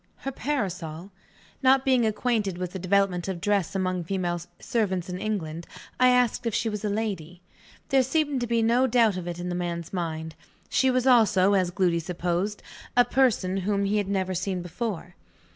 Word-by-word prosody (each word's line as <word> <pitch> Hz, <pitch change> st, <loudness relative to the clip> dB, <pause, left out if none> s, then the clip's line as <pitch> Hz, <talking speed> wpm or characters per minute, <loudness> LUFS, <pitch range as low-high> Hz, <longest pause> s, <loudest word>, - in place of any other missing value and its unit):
Her 270 Hz, -, -1 dB
parasol? 190 Hz, -, -3 dB, 0.5 s
Not 265 Hz, 0 st, +4 dB
being 255 Hz, -4 st, +3 dB
acquainted 215 Hz, -4 st, 0 dB
with 180 Hz, -1 st, -4 dB
the 190 Hz, -, -6 dB
development 185 Hz, -1 st, +1 dB
of 190 Hz, -3 st, -3 dB
dress 200 Hz, 0 st, 0 dB
among 185 Hz, -2 st, -1 dB
female 175 Hz, -1 st, -2 dB, 0.2 s
servants 190 Hz, -6 st, -1 dB
in 180 Hz, 0 st, -4 dB
England, 170 Hz, -6 st, -3 dB, 0.3 s
I 255 Hz, -, +6 dB
asked 250 Hz, -2 st, +2 dB
if 230 Hz, -, -1 dB
she 230 Hz, -, 0 dB
was 210 Hz, -1 st, -5 dB
a 210 Hz, -, 0 dB
lady. 185 Hz, -5 st, -4 dB, 0.5 s
There 270 Hz, -1 st, +4 dB
seemed 285 Hz, 0 st, 0 dB
to 240 Hz, -, -1 dB
be 230 Hz, 0 st, +1 dB
no 240 Hz, +3 st, +3 dB
doubt 230 Hz, -4 st, +3 dB
of 180 Hz, -1 st, -5 dB
it 175 Hz, -1 st, -4 dB
in 175 Hz, 0 st, -4 dB
the -, -, -2 dB
man's 170 Hz, -1 st, -4 dB
mind. 160 Hz, -3 st, -3 dB, 0.4 s
She 265 Hz, -, +3 dB
was 255 Hz, 0 st, +1 dB
also, 210 Hz, -6 st, +5 dB
as 185 Hz, -3 st, +2 dB
Gloody 180 Hz, -2 st, +1 dB
supposed, 180 Hz, +4 st, -2 dB, 0.3 s
a 245 Hz, -, +7 dB
person 235 Hz, -8 st, +2 dB
whom 200 Hz, +1 st, 0 dB
he 205 Hz, +2 st, +1 dB
had 205 Hz, -2 st, 0 dB
never 190 Hz, -1 st, -1 dB
seen 185 Hz, 0 st, -2 dB
before. 180 Hz, -1 st, -5 dB
195 Hz, 185 wpm, -26 LUFS, 180-230 Hz, 0.5 s, a